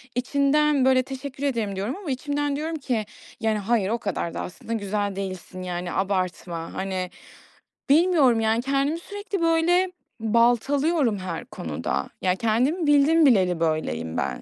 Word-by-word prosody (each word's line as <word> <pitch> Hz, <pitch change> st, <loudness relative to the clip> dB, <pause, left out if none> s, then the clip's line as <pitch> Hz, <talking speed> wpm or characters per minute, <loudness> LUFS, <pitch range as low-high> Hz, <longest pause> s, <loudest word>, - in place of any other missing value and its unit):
içimden 280 Hz, +2 st, +2 dB
böyle, 260 Hz, -1 st, +4 dB
"Teşekkür 270 Hz, +1 st, -7 dB
ederim." 230 Hz, -8 st, -1 dB
diyorum 200 Hz, +7 st, -2 dB
ama 375 Hz, -8 st, -5 dB
içimden 285 Hz, +2 st, -1 dB
diyorum 315 Hz, +3 st, -3 dB
ki, 250 Hz, -7 st, -2 dB, 0.3 s
"Yani, 220 Hz, -1 st, +1 dB
hayır, 210 Hz, -1 st, +1 dB
o 230 Hz, -, +1 dB
kadar 200 Hz, -6 st, -3 dB
da -, -, -4 dB
aslında 200 Hz, +5 st, -6 dB
güzel 205 Hz, -2 st, -2 dB
değilsin. 185 Hz, -1 st, -6 dB
Yani, 180 Hz, -1 st, -4 dB
abartma." 185 Hz, -3 st, -2 dB
Hani, 190 Hz, -1 st, -3 dB, 0.8 s
bilmiyorum. 295 Hz, -6 st, +5 dB
Yani, 225 Hz, +1 st, +2 dB
kendimi 275 Hz, +4 st, 0 dB
sürekli 405 Hz, 0 st, -5 dB
böyle 340 Hz, +3 st, +3 dB, 0.3 s
baltalıyorum 240 Hz, +4 st, +2 dB
her 180 Hz, -3 st, -5 dB
konuda. 70 Hz, -3 st, -4 dB
Ya, 185 Hz, -1 st, +2 dB
kendimi 255 Hz, -, +1 dB
bildim 295 Hz, +3 st, +5 dB
bileli 185 Hz, -, +4 dB
böyleyim 80 Hz, -, -1 dB
ben. 70 Hz, -3 st, -2 dB
235 Hz, 140 wpm, -24 LUFS, 190-285 Hz, 0.8 s, bilmiyorum